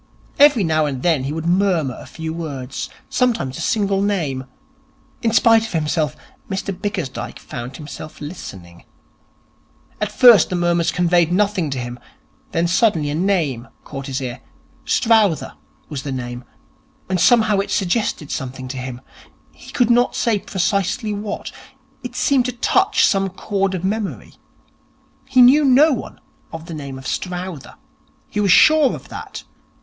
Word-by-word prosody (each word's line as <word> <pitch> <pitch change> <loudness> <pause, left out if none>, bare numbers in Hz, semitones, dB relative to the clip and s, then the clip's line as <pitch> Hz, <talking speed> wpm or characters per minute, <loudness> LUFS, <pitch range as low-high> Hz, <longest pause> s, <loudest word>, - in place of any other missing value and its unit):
Every 285 -7 +6
now 155 -2 +1
and 135 -3 -4
then 160 -7 +2
he 140 - -3
would 160 +1 -4
murmur 175 -7 +1
a - - -11
few 160 -1 -6
words, 140 -6 -5 0.2
sometimes 225 - 0
a - - -4
single 200 -2 +1
name. 160 -11 -1 0.8
In 230 - +1
spite 225 0 +4
of - - -10
himself, 150 -3 0 0.3
Mr 195 0 -3
Bickersdyke 185 -8 -4
found 125 +1 -8
himself 155 0 -9
listening. 95 - -9 1.2
At 210 -1 -1
first 235 -5 +7
the 185 - -2
murmurs 175 -1 +1
conveyed 175 -1 +2
nothing 195 -3 +1
to 135 - -3
him. 120 0 -5 0.5
Then 170 -3 +1
suddenly 170 -5 +2
a - - -2
name 155 -8 0 0.2
caught 135 +1 -7
his 135 -1 -3
ear. 125 -1 -5 0.4
Strowther 220 -8 +2 0.3
was 145 -4 -5
the 140 -1 -5
name, 120 -1 -5 0.6
and 185 -1 -1
somehow 220 -4 +4
it 195 - -2
suggested 185 -5 -1
something 130 0 -5
to 135 - -5
him. 125 -1 -6 0.5
He - - -14
could 245 -2 +2
not 245 +1 +3
say 225 -4 +1
precisely 200 +4 -1
what. 205 0 -5 0.5
It 250 -1 -8
seemed 265 -2 +2
to 250 - -2
touch 380 +10 +2
some 195 0 +1
chord 195 0 -2
of 180 - -5
memory. 205 +1 -3 0.9
He 260 -2 +5
knew 280 +5 +6
no 280 +3 +5
one 245 - -6 0.3
of 165 0 -8
the 170 - -8
name 140 -3 -7
of 130 - -11
Strowther. 180 -3 -5 0.5
He 210 - -4
was 200 -3 +3
sure 310 - +6
of - - -12
that. - - -8
180 Hz, 155 wpm, -20 LUFS, 145-210 Hz, 1.2 s, first